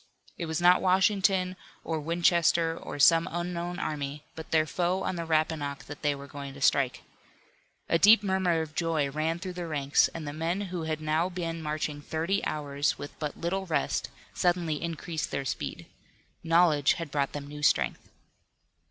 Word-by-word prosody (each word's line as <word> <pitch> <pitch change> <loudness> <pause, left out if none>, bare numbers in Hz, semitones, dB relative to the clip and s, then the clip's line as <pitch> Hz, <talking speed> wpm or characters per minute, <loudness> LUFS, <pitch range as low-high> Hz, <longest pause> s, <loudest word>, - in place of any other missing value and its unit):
It 170 - -4
was 160 0 -1
not 180 +1 +5
Washington, 190 0 +2 0.3
or 160 -1 -2
Winchester, 170 0 +2
or - - -7
some 165 +4 +5
unknown 175 0 -3
army, 145 -2 -4
but 160 - -8
their 155 -1 +3
foe 180 +4 -1
on 185 - -2
the 170 -1 -4
Rappahannock 155 -3 0
that 145 - -10
they 145 -1 +1
were 140 0 -9
going 140 -1 -8
to - - -10
strike. 135 -2 +2 0.8
A 165 - +2
deep 210 +2 +7
murmur 190 -4 +1
of 155 -1 -10
joy 160 -4 0
ran 155 +3 -1
through 185 +1 -6
the 175 -1 -5
ranks, 140 -3 +2
and 160 -3 -7
the 145 - -4
men 165 +4 -1
who 180 -4 -4
had 155 -1 -2
now 155 +3 +1
been 165 -2 -4
marching 150 -1 -3
thirty 165 +6 -1
hours, 145 -1 -1
with 145 - -7
but 150 -2 -4
little 190 +3 -2
rest, 165 - -1 0.2
suddenly 175 -4 0
increased 165 -1 -3
their 135 - -3
speed. - - -4 0.6
Knowledge 165 -4 +4
had 165 -4 -6
brought 140 -1 0
them 145 -1 -5
new 150 +1 -9
strength. 150 - +1
165 Hz, 175 wpm, -28 LUFS, 150-175 Hz, 0.8 s, deep